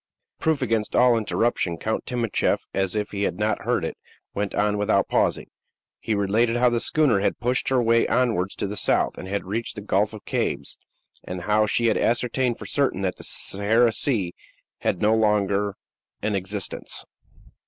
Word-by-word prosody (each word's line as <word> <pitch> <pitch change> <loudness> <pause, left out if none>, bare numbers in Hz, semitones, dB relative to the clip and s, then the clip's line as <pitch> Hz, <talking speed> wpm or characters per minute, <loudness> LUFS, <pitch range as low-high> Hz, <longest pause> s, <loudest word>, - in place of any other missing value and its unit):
Proof 155 -4 +1
against 110 -3 -1
all 125 -1 +5
interruption, 110 -5 0
Count 110 +5 -3
Timascheff, 120 -3 0
as 95 0 -1
if 105 -1 -2
he 100 - -4
had 95 - -1
not 105 -1 -1
heard 120 -8 +1
it, - - -5 0.4
went 100 -1 -2
on 105 0 +1
without 105 -1 +2
pausing. - - +1 0.5
He 110 - -1
related 110 +4 +1
how 125 0 +3
the 120 - +1
schooner 140 -6 +2
had - - 0
pushed 125 +1 0
her 130 -1 +3
way 115 -1 +3
onwards 110 -7 +1
to - - -3
the 100 +1 -4
south, - - +1
and 95 - -7
had 100 +1 -3
reached 110 +5 -3
the 105 - -6
Gulf 105 +1 +1
of 110 - -10
Cabes; - - -2 0.4
and 90 0 -6
how 105 +2 +2
she 115 +3 +1
had 115 - +3
ascertained 120 +1 +1
for - - -9
certain 135 -9 0
that 95 -1 -1
the - - -10
Sahara 110 +4 +2
Sea 105 -7 0 0.5
had 90 - -1
no 110 +1 +4
longer 105 -2 +1 0.5
an 105 0 0
existence. 95 +1 -4
105 Hz, 180 wpm, -24 LUFS, 100-120 Hz, 0.5 s, all